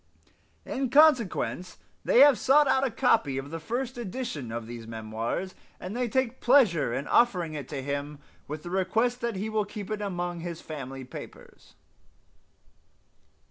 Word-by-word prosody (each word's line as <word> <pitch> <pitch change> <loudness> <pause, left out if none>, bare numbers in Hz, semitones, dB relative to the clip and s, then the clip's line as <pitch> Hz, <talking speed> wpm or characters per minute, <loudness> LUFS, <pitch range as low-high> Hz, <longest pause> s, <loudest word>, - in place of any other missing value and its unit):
In 265 -1 -2
consequence 230 - +3 0.3
they 245 - +5
have 280 -6 +7
sought 285 +2 +5
out 265 0 +3
a 270 - +2
copy 225 - +2
of 135 +2 -5
the 165 - -4
first 245 +8 -4
edition 200 - -5
of 115 0 -4
these 115 -1 -8
memoirs, 115 +10 -4 0.3
and 185 +4 -6
they 245 -1 -1
take 260 +1 -1
pleasure 220 - +4
in 130 +4 -3
offering 180 -9 +2
it 145 -4 -6
to 140 -3 -5
him, 145 +1 -4 0.3
with 150 +1 -6
the 175 - -7
request 220 +7 0
that 235 -2 -2
he 200 +3 -3
will 215 -1 0
keep 205 0 -8
it 215 -1 -2
among 175 -3 -3
his 170 -1 -6
family 135 -3 -7
papers." 125 - -12
185 Hz, 160 wpm, -27 LUFS, 145-240 Hz, 0.3 s, have